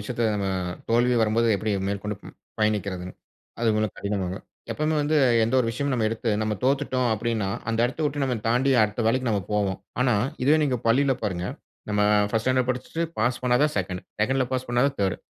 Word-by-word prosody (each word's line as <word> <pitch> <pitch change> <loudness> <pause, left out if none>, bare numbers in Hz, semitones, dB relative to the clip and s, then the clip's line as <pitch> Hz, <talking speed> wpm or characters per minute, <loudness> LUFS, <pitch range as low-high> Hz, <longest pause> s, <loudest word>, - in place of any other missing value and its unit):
விஷயத்துல 115 +1 -1
நம்ம 100 - -2 0.4
தோல்வி 120 +2 +3
வரும்போது 115 +1 +2
எப்டி 110 +1 -2 0.2
மேற்கொண்டு 100 +1 -3 0.4
பயணிக்கிறதுன்னு, 100 -4 -1 0.5
அது 115 - 0
ரொம்ப 110 0 +1
கடினம் 100 -2 -2
தான். - - -11 0.3
எப்பவுமே 155 +1 0
வந்து 150 +1 +1 0.3
எந்த 115 +4 -1
ஒரு 125 - +2
விஷயமும் 140 +4 -2
நம்ம 110 -3 +1
எடுத்து 115 +1 -2
நம்ம 110 -1 0
தோத்துட்டோம் 130 -2 +1
அப்டின்னா, 110 -2 -1 0.2
அந்த 115 - -1
எடத்த 125 +6 -3
விட்டு 145 -1 -1
நம்ம 130 - 0
தாண்டி 125 +4 +2
அடுத்த 105 +2 0
வேலைக்கு 130 +2 +1
நம்ம 105 - +1
போவோம். 100 -2 0 0.2
ஆனா, 125 -2 +3 0.3
இதுவே 150 +4 +5
நீங்க 130 -3 0
பள்ளில 135 +3 +3
பாருங்க, 90 -4 -2 0.4
நம்ம 105 -1 +1 0.3
1ஸ்டு 115 0 -1
ஸ்டாண்டர்ட் 130 -1 +2
படிச்சிட்டு 130 +6 -3 0.2
பாஸ் 120 +2 +1
பண்ணாதான் 125 +5 +2
2ன்டு 90 -2 -3 0.2
2ன்டுல 130 +4 +2
பாஸ் 130 0 -2
பண்ணாதான் 125 +3 +2
3ர்டு 95 -2 +1
115 Hz, 180 wpm, -25 LUFS, 105-130 Hz, 0.5 s, இதுவே